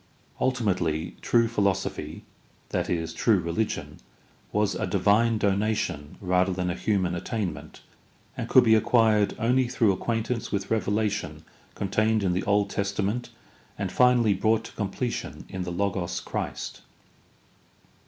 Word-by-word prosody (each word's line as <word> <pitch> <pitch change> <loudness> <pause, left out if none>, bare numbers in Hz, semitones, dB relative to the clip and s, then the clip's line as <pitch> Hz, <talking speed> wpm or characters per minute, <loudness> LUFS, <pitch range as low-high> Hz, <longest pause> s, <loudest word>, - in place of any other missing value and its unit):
Ultimately 90 -10 0
true 115 -1 +3
philosophy, 100 -4 -1 0.5
i.e., 80 -2 -1
true 105 +4 +3
religion, 85 +6 -3 0.5
was 105 -1 +1
a - - -2
divine 105 +4 +3
donation 100 -7 -1
rather 90 0 +2
than 90 -1 -1
a - - -3
human 95 -5 0
attainment, 100 +2 -4 0.5
and - - -5
could - - +7
be 110 - +5
acquired 110 -2 +3
only 125 +2 +2
through 120 -4 +2
acquaintance 115 +4 -2
with 100 -1 -2
revelation 105 -6 -1 0.3
contained 110 +2 +1
in 90 -2 +1
the 90 - 0
Old 100 0 +2
Testament 100 +4 -2 0.5
and - - -3
finally 125 -4 +4
brought 110 +3 +1
to - - -10
completion 110 +4 -4
in 95 -1 -4
the 90 - -4
Logos 90 -1 -1
Christ. - - -5
100 Hz, 125 wpm, -26 LUFS, 95-115 Hz, 0.5 s, could